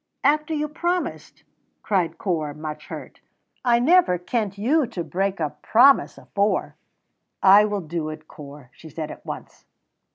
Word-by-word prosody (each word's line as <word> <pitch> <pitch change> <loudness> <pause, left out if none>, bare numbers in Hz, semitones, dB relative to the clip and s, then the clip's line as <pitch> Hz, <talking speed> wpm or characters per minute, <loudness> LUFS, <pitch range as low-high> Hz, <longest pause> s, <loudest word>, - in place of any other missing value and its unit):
"After 305 +2 +2
you 300 0 -1
promised!" 345 +4 -3 0.4
cried 175 -5 0
Corp, 155 -6 -2
much 155 0 -7
hurt. - - -9 0.4
"I 240 -2 +4
never 290 - +4
kent 200 +2 -3
you 265 +7 +2
to 190 -7 -5
break 195 +2 -2
a 155 -3 -1
promise 270 +5 +4
afore." 205 +1 -1 0.7
"I 200 +2 +8
will 205 -1 -2
do 160 -1 -4
it, 155 0 -9
Corp," 140 -3 -12
she 160 +5 -14
said, 155 0 -6
at - - -11
once. - - -9
195 Hz, 150 wpm, -23 LUFS, 155-250 Hz, 0.7 s, I